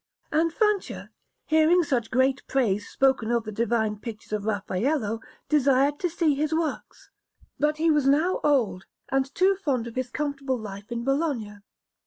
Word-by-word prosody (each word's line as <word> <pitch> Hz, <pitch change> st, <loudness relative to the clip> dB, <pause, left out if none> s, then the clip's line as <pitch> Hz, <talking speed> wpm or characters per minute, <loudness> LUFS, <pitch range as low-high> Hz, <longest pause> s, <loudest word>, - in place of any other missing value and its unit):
And 325 Hz, +2 st, +2 dB
Francia, 420 Hz, +1 st, -1 dB, 0.3 s
hearing 315 Hz, +3 st, +4 dB
such 245 Hz, -7 st, -1 dB
great 260 Hz, +2 st, +2 dB
praise 210 Hz, -7 st, 0 dB
spoken 265 Hz, -4 st, +2 dB
of 235 Hz, -1 st, +1 dB
the 215 Hz, -, -6 dB
divine 220 Hz, -1 st, 0 dB
pictures 215 Hz, -1 st, -8 dB
of 210 Hz, -1 st, -2 dB
Raffaello, 220 Hz, +3 st, -1 dB, 0.3 s
desired 280 Hz, -1 st, +3 dB
to 355 Hz, -, 0 dB
see 325 Hz, -2 st, +1 dB
his 305 Hz, +3 st, -1 dB
works; 320 Hz, -2 st, -4 dB, 0.5 s
but 300 Hz, +1 st, +1 dB
he 325 Hz, +1 st, +3 dB
was 295 Hz, -3 st, +2 dB
now 310 Hz, +7 st, +3 dB
old, 245 Hz, -10 st, +1 dB, 0.2 s
and 270 Hz, 0 st, 0 dB
too 385 Hz, +2 st, +4 dB
fond 280 Hz, -11 st, -1 dB
of 235 Hz, -, -7 dB
his 255 Hz, 0 st, -3 dB
comfortable 280 Hz, -2 st, -2 dB
life 205 Hz, -1 st, -9 dB
in 235 Hz, 0 st, -3 dB
Bologna. 270 Hz, -7 st, -1 dB
270 Hz, 160 wpm, -26 LUFS, 225-305 Hz, 0.5 s, hearing